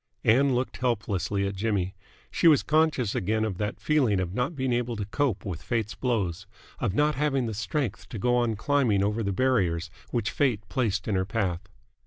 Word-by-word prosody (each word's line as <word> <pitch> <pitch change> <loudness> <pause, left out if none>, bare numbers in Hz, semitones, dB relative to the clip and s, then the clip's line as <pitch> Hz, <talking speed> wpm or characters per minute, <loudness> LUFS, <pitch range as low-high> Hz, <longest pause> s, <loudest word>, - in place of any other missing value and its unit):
Ann 130 +3 +4
looked 125 +1 -2
helplessly 100 -5 -1
at 100 - -2
Jimmy. 95 -2 -1 0.4
She 170 - +3
was 150 -4 +6
conscious 155 -8 +2
again 110 +4 0
of 95 -5 -4
that 105 -1 -2
feeling 130 -10 +2
of 90 -1 -2
not 125 - -1
being 130 -2 0
able 120 0 -1
to 105 -2 -3
cope 110 -2 -1
with 90 -4 -4
Fate's 110 -3 -2
blows, 95 -7 -2 0.3
of 95 - -1
not 150 +3 +3
having 135 -2 0
the 110 - -3
strength 120 +2 -3
to 115 - -6
go 125 +4 +2
on 120 -2 +1
climbing 120 -5 +2
over 105 +3 0
the 100 -2 -1
barriers 95 -8 +1 0.2
which 115 -3 -1
Fate 115 -8 0
placed 120 -8 -1
in 105 - 0
her 95 -1 +2
path. 95 -5 -1
115 Hz, 195 wpm, -27 LUFS, 100-130 Hz, 0.4 s, was